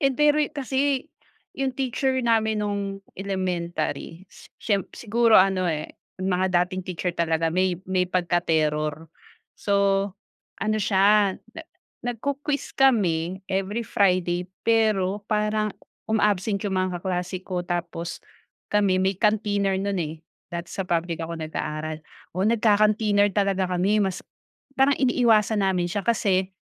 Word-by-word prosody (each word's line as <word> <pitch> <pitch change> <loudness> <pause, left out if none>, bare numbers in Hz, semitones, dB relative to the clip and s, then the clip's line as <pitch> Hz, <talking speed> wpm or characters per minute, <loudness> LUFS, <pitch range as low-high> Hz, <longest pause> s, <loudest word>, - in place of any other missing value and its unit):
Yun 275 -2 +2
pero'y 295 0 +3
kasi, 275 0 -1 0.5
yung 270 -1 -1
teacher 260 0 0
namin 220 -2 +2
nung 200 -1 -3 0.2
elementary 180 -3 -3
si - - -16
siyemp 200 -4 -1
siguro 230 0 +3
ano, 185 -1 +2
eh, 155 -2 -4 0.2
mga 185 -1 +2
dating 185 +1 -6
teacher 180 0 -3
talaga 165 -1 +1
may 185 0 +1
may 185 -1 +2
pagka-terror. 160 -3 0 0.5
So, 200 - -2 0.9
ano 215 0 0
siya 200 0 +4 0.2
na - - -5 0.4
nag-ku-quiz 280 +4 -3
kami 190 -9 +2
every 195 +3 -1
friday, 180 -3 +1 0.2
pero 210 -3 +2
parang 215 -1 0 0.4
uma-absent 210 -2 +1
'yong 195 -2 -1
mga 185 0 +1
kaklase 180 0 -3
ko 180 -2 -3
tapos 175 -1 -4 0.5
kami 200 -3 +3
may 190 0 +1
canteener 205 -2 +1
no'n, 200 0 -1
eh, 155 -1 -3 0.4
dati 170 0 -5
sa 195 - -3
public 170 -2 -1
ako 165 0 -6
nag-aaral. 155 0 -4 0.4
Oo, 185 - +1
nagca-canteener 210 -2 +3
talaga 195 -1 +1
kami 195 +4 +2
mas 190 -1 -3 0.6
parang 270 +1 +5
iniiwasan 225 -5 +3
namin 180 -2 +1
siya 200 +2 -3
kasi 190 -5 +1
195 Hz, 125 wpm, -24 LUFS, 180-215 Hz, 0.9 s, parang